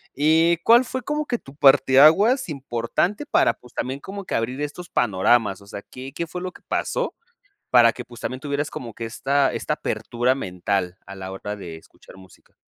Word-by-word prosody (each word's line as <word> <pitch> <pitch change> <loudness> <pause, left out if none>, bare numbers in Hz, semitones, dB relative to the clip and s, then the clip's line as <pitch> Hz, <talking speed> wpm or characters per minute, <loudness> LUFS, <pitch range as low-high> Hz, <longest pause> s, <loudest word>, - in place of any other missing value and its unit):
eh, 160 +4 +3
¿cuál 235 +2 +6
fue 260 +1 -4
como 300 +4 -2
que 245 -5 -1
tu 135 -7 -15
parte 135 -2 +5
aguas 205 - +5
importante 140 - -2
para, - - +3
pues, 125 -1 -19
también 130 +2 -3
como 195 +5 -8
que - - -3
abrir 125 +5 -2
estos 160 +5 -6
panoramas? 105 - +2
O 100 - -17
sea, 100 0 -7
¿qué 130 +4 -10
qué 170 - -4
fue 180 +3 -6
lo 185 0 -4
que - - -17
pasó, - - -2 0.5
para 120 -2 +6
que, 125 - -8
pues, 120 -1 -13
también 130 - -4
tuvieras 145 0 -2
como 115 -3 -7
que 115 - -6
esta 135 +4 +1
esta - - -2
apertura 120 +2 -1
mental 90 -4 -2
a 100 - -9
la 95 0 -7
hora 105 +2 -5
de 85 -5 -8
escuchar 80 - -18
música? 95 -1 -19
130 Hz, 200 wpm, -23 LUFS, 115-165 Hz, 0.5 s, cuál